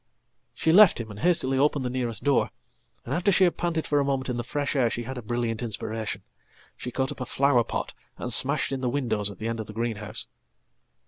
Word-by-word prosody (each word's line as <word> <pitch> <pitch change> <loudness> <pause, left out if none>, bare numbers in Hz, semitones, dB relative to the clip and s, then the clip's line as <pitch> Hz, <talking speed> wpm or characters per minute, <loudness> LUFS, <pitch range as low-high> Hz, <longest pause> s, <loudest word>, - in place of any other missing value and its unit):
She 160 - +2
left 200 -5 +7
him 110 -2 -6
and 105 - -9
hastily 135 -4 +2
opened 145 -1 +2
the - - 0
nearest 120 -4 -2
door, 140 -1 +2 0.6
and, 125 - -3
after 175 +5 +2
she 190 0 +4
hadpanted 170 -2 +1
for 145 - +2
a - - +2
moment 135 -1 -1
in 125 - -2
the 120 - -2
fresh 145 +3 -2
air, 125 -4 +3
she 120 - -4
had 130 +3 -6
a 125 - -5
brilliant 115 0 -2
inspiration. 110 -1 -4 0.5
Shecaught 130 +3 -3
up 145 - -8
a - - -2
flower 135 -3 +3
pot - - -4 0.2
and 125 - -2
smashed 140 +3 +3
in 135 -1 -2
the 125 - 0
windows 120 -6 0
at 100 - -10
the 110 - -4
end 115 0 -3
of 110 - -5
thegreenhouse. 110 -1 -3
130 Hz, 215 wpm, -26 LUFS, 115-145 Hz, 0.6 s, left